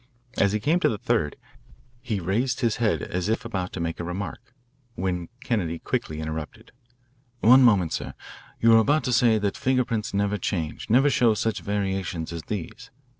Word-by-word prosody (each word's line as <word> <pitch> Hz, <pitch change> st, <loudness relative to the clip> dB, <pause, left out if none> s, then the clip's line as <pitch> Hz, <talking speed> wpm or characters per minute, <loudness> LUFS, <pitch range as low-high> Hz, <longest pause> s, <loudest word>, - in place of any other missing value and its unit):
As 100 Hz, -, +3 dB
he 105 Hz, -, 0 dB
came 155 Hz, +10 st, +2 dB
to -, -, +3 dB
the 110 Hz, -, -2 dB
third, 75 Hz, -6 st, 0 dB, 0.7 s
he 110 Hz, -5 st, -2 dB
raised 115 Hz, +9 st, -1 dB
his 115 Hz, -4 st, +1 dB
head 115 Hz, -2 st, +1 dB
as 90 Hz, +2 st, -2 dB
if 110 Hz, -, -1 dB
about 95 Hz, -6 st, -3 dB
to -, -, -5 dB
make 85 Hz, 0 st, -3 dB
a -, -, -3 dB
remark, 90 Hz, +6 st, -6 dB, 0.4 s
when 90 Hz, -2 st, -2 dB
Kennedy 95 Hz, -10 st, -1 dB
quickly 80 Hz, -1 st, -3 dB
interrupted. 80 Hz, -1 st, -6 dB, 0.7 s
"One 125 Hz, +4 st, +7 dB
moment, 100 Hz, -9 st, +4 dB
sir. -, -, -4 dB, 0.4 s
You 115 Hz, -, +5 dB
were 115 Hz, -, +8 dB
about 145 Hz, +7 st, +2 dB
to 125 Hz, -, 0 dB
say 115 Hz, -2 st, +4 dB
that 100 Hz, -2 st, -1 dB
finger 130 Hz, -1 st, +1 dB
prints 115 Hz, -3 st, -2 dB
never 100 Hz, +1 st, 0 dB
change, 85 Hz, -1 st, -3 dB
never 135 Hz, +6 st, +5 dB
show 120 Hz, -7 st, +3 dB
such 110 Hz, +1 st, -1 dB
variations 95 Hz, -5 st, -3 dB
as 85 Hz, -, -5 dB
these. 100 Hz, -6 st, -6 dB
105 Hz, 180 wpm, -25 LUFS, 90-115 Hz, 0.7 s, were